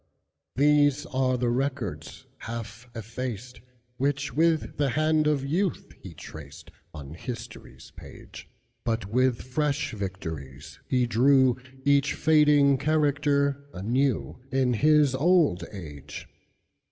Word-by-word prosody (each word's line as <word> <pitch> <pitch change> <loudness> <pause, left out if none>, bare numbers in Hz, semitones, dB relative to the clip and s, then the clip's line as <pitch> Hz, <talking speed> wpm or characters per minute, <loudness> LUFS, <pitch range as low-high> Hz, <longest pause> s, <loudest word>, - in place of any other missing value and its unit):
These 145 +1 +3
are 130 -3 0
the 120 -1 0
records, 120 - -3
half 115 +1 -7
effaced, 120 +1 -6 0.4
Which, 140 +1 -1
with 160 0 +1
the 145 -2 +1
hand 155 +2 +2
of 145 -3 +1
youth, 175 +6 -2
he - - -10
tracedOn 75 -1 -11
history's 120 +3 -9
page; - - -12 0.3
But 115 -2 -1
with 125 +4 +1
fresh 140 +1 -1
victories 80 -8 -7
he 125 -1 +2
drewEach 130 +2 +2
fading 150 -3 +4
character 140 -2 +1
anewIn 130 +3 -1
his 150 0 +4
old 145 - +2
age. 75 -8 -9
130 Hz, 100 wpm, -26 LUFS, 115-145 Hz, 0.4 s, fading